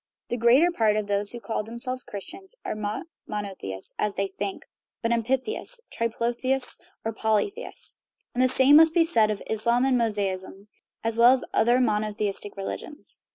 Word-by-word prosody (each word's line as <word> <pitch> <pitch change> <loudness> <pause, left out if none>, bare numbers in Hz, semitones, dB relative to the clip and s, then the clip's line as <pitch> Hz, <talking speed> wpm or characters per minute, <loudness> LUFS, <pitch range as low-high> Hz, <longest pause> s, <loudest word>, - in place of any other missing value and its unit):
The 240 - -1
greater 250 +9 +5
part 220 -9 +2
of 215 -1 0
those 205 0 0
who 240 - -6
call 230 -2 -2
themselves 240 +4 -3
Christians 380 - -9
are - - -2
not 215 +8 -4 0.2
monotheists 195 - -4
(as 210 -1 0
they 195 - 0
think), 195 +1 -5 0.4
but 230 - +1
amphitheists, 260 - -1
triplotheists, 240 +3 -1 0.3
or 225 - -1
polytheists. 220 - -1 0.3
And 245 - 0
the 255 - +5
same 265 +3 +6
must 320 +1 +6
be 335 -1 +5
said 225 -10 +3
of 210 -2 -3
Islam 235 +3 +1
and 260 -2 +3
Mosaism, 200 -2 -2 0.3
and 225 0 -1 0.3
other 240 +2 +4
monotheistic 210 -3 -1
religions. 290 +9 -6
230 Hz, 155 wpm, -26 LUFS, 210-255 Hz, 0.4 s, same